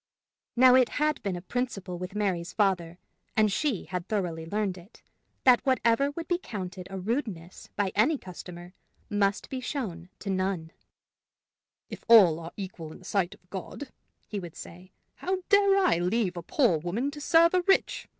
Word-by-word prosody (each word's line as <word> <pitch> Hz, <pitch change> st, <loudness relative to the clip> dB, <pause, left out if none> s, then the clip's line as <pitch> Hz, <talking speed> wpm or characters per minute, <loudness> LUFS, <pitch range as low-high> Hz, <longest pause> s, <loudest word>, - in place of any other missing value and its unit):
Now 255 Hz, +1 st, +7 dB
it 255 Hz, -1 st, +5 dB
had 300 Hz, 0 st, +1 dB
been 195 Hz, -3 st, -2 dB
a 175 Hz, -, -7 dB
principle 195 Hz, -6 st, -3 dB
with 185 Hz, +2 st, -6 dB
Mary's 185 Hz, -4 st, -1 dB
father, 180 Hz, -5 st, 0 dB, 0.4 s
and 215 Hz, -1 st, +4 dB
she 260 Hz, -, 0 dB
had 180 Hz, -2 st, -5 dB
thoroughly 175 Hz, -6 st, -2 dB
learned 205 Hz, 0 st, -1 dB
it, 180 Hz, +4 st, -16 dB, 0.4 s
that 250 Hz, -2 st, +6 dB
whatever 260 Hz, 0 st, +2 dB
would 330 Hz, +3 st, -6 dB
be 350 Hz, -1 st, 0 dB
counted 185 Hz, -, -6 dB
a 195 Hz, -, -6 dB
rudeness 190 Hz, -, -4 dB
by 200 Hz, -3 st, 0 dB
any 265 Hz, +9 st, +3 dB
customer, 180 Hz, -3 st, -10 dB, 0.4 s
must 200 Hz, -1 st, +1 dB
be 260 Hz, -, -3 dB
shown 210 Hz, -, -5 dB
to 195 Hz, -, -4 dB
none. 185 Hz, -4 st, -2 dB, 1.2 s
"If -, -, -9 dB
all 195 Hz, -9 st, +7 dB
are 165 Hz, 0 st, -8 dB
equal 185 Hz, -5 st, -7 dB
in -, -, -11 dB
the 185 Hz, -, -17 dB
sight 190 Hz, -2 st, -1 dB
of 180 Hz, -, -30 dB
God," 225 Hz, +8 st, -7 dB, 0.4 s
he 205 Hz, -, -4 dB
would 175 Hz, -3 st, -9 dB
say, 180 Hz, +2 st, -11 dB, 0.3 s
"how 375 Hz, 0 st, -2 dB
dare 400 Hz, -1 st, +5 dB
I 370 Hz, -, +3 dB
leave 185 Hz, +1 st, 0 dB
a 175 Hz, -, -5 dB
poor 180 Hz, -, +2 dB
woman 210 Hz, -, -2 dB
to 295 Hz, 0 st, -9 dB
serve 335 Hz, +3 st, +5 dB
a 365 Hz, -, +3 dB
rich? 390 Hz, +2 st, +1 dB
195 Hz, 175 wpm, -28 LUFS, 180-255 Hz, 1.2 s, Now